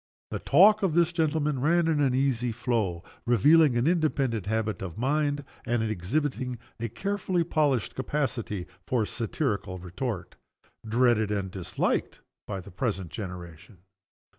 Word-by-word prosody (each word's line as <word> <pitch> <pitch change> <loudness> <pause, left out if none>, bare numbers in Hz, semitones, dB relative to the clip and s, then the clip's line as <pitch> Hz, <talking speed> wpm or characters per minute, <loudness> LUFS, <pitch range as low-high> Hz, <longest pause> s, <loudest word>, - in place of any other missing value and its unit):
The - - -2
talk 210 +4 +6
of 185 -6 +1
this 170 0 +3
gentleman 150 -4 0
ran 170 +3 +3
in 160 -2 +2
an 135 -3 +2
easy 125 -3 +1
flow 110 -7 -1 0.2
revealing 145 +4 +5
an 120 - +2
independent 140 - +1
habit 110 -2 -1
of 95 -1 -6
mind, 145 +3 0 0.2
and 120 -1 0
exhibiting 125 - -1 0.2
a 115 0 -2
carefully 185 - -1
polished 145 -8 +1
capacity 125 -9 -2 0.2
for 120 -4 +1
satirical 105 - -2
retort 90 +3 -5 0.5
dreaded 115 -1 +2
and 100 -3 -2
disliked 90 -1 -1 0.3
by 100 -2 -3
the - - -12
present 95 - -2
generation. 90 0 -8
120 Hz, 135 wpm, -27 LUFS, 105-150 Hz, 0.5 s, talk